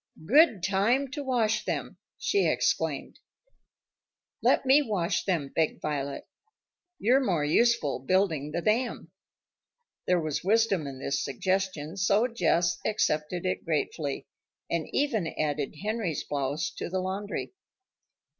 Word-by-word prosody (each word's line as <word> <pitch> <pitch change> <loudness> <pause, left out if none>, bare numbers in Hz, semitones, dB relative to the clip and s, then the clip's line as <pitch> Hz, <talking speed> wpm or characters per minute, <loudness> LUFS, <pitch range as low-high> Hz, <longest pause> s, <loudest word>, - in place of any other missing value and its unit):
"Good 240 - +5
time 220 +9 +2
to 290 - -4
wash 225 -5 +1
them!" - - -3 0.2
she 400 -1 +1
exclaimed. - - 0 1.2
"Let - - +3
me 270 +3 +6
wash 200 -8 -1
them," 165 -8 0
begged 160 -1 +1
Violet. 140 -2 -3 0.7
"You're 255 +5 +3
more 170 - +1
useful 195 - +2
building 160 -2 +1
the 170 +3 -3
dam." 225 -6 0 1.0
There 180 -1 +3
was 155 -3 -2
wisdom 200 -5 +2
in 135 -1 -7
this 140 +1 -2
suggestion, 185 +1 -2
so 200 +4 +3
Jess 175 -8 +1
accepted 175 -4 0
it 185 - -1
gratefully, 150 -2 -2 0.5
and 170 -2 -1
even 235 - 0
added 145 -2 -1
Henry's 210 -8 -2
blouse 145 +4 -2
to - - -4
the 185 +1 -1
laundry. 195 - -4
185 Hz, 125 wpm, -28 LUFS, 155-220 Hz, 1.2 s, me